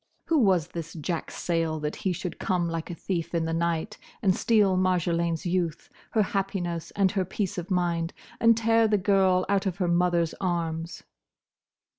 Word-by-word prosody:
Who 325 -2 +4
was 185 - +3
this 165 -2 -6
Jack 165 +1 -3
Sayle 165 -2 -1
that 150 0 -3
he 190 - -1
should 180 0 -5
come 180 -2 0
like 165 0 -4
a 175 - -5
thief 170 -1 -3
in 165 -1 +1
the 165 - -2
night 170 +5 -1 0.2
and 190 -3 +4
steal 210 -5 +3
Marjolaine's 170 -2 +1
youth, 175 -2 -1 0.2
her 220 - +4
happiness 190 -4 -2
and 195 -2 +3
her 190 - 0
peace 190 0 -3
of 175 +3 -7
mind, 170 -2 0 0.3
and 230 -1 +5
tear 225 0 +3
the 210 -1 +3
girl 190 -1 +3
out 200 0 +1
of 185 -1 -2
her 185 -3 0
mother's 170 -1 +2
arms? 165 -2 -2
180 Hz, 175 wpm, -27 LUFS, 170-195 Hz, 0.3 s, and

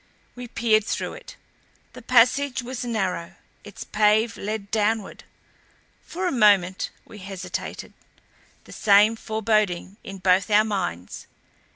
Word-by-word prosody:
We 245 0 -8
peered 225 -2 +2
through - - -3
it. - - -12 0.6
The - - -11
passage 255 +2 +3
was 250 0 -5
narrow; 190 -7 -3 0.3
its 205 -2 -9
pave 215 +1 +2
led 205 -1 -5
downward. 215 -1 -1 0.8
For 365 +2 -5
a 360 - 0
moment 200 -6 +3 0.2
we 210 - -13
hesitated, 185 -2 -7 0.7
the - - -16
same 210 +2 +4
foreboding 215 -4 -1
in 195 - -8
both 185 +1 +2
our 215 +1 +4
minds. 175 - -4
210 Hz, 125 wpm, -24 LUFS, 195-225 Hz, 0.8 s, same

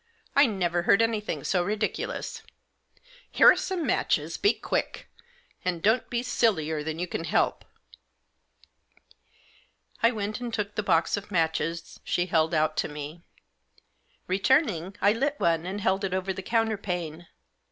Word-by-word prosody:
I 280 0 +6
never 175 -5 0
heard 195 +4 +4
anything 225 -2 0
so 180 -2 +1
ridiculous. 210 +3 -3 0.9
Here - - +7
are - - +3
some 365 -4 -2
matches. 165 - 0
Be 205 - +3
quick; - - -3 0.6
and 180 -2 -1
don't 220 +4 +2
be 240 0 -1
sillier 160 -11 +1
than 160 +1 -4
you 175 - -1
can 165 - -4
help." - - +1 2.4
I 230 - +6
went 215 -2 -3
and 245 -1 -5
took 210 -2 -3
the 215 - -1
box 170 -2 +2
of 205 0 -7
matches 165 -2 -1
she 175 - 0
held 160 -2 +1
out 155 0 +1
to - - +1
me. 150 +2 -8 1.0
Returning, 195 - +1
I 205 - +5
lit 280 +5 -1
one 165 0 +1
and 195 +2 -4
held 195 0 0
it 190 -1 -1
over 190 +1 -2
the 190 - -6
counter 225 +1 0
pane. 175 -4 -5
190 Hz, 150 wpm, -27 LUFS, 165-220 Hz, 2.4 s, Here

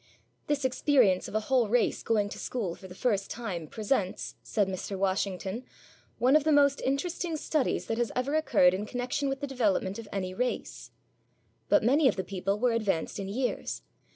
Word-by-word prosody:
'This 290 -2 0
experience 250 -7 +3
of - - -8
a 215 - +2
whole 245 -1 +2
race 245 +2 +2
going 210 -3 +1
to - - -8
school 210 -9 -3
for 190 - -11
the 180 - -11
first 205 -4 0
time 190 -9 -4
presents,' 210 - -1
says 205 -3 0
Mr. 190 +1 -4
Washington, 195 +3 -1 0.5
'one 255 +5 +4
of 305 - +5
the 310 - +2
most 280 -1 +4
interesting 325 +4 -1
studies 300 -2 0
that 225 +1 -2
has 240 - 0
ever 255 +3 -1
occurred 245 -13 +4
in 200 +3 -3
connexion 250 +4 -2
with 270 +1 -3
the - - -1
development 215 -7 0
of 225 - -8
any 185 -2 -3
race.' 250 +5 -3 0.8
But - - +5
many 275 +5 +4
of 240 - +2
the 190 - -2
people 195 +2 -2
were 245 +2 +2
advanced 205 -6 -1
in 195 - -4
years. 250 +6 -2
230 Hz, 185 wpm, -29 LUFS, 195-265 Hz, 0.8 s, of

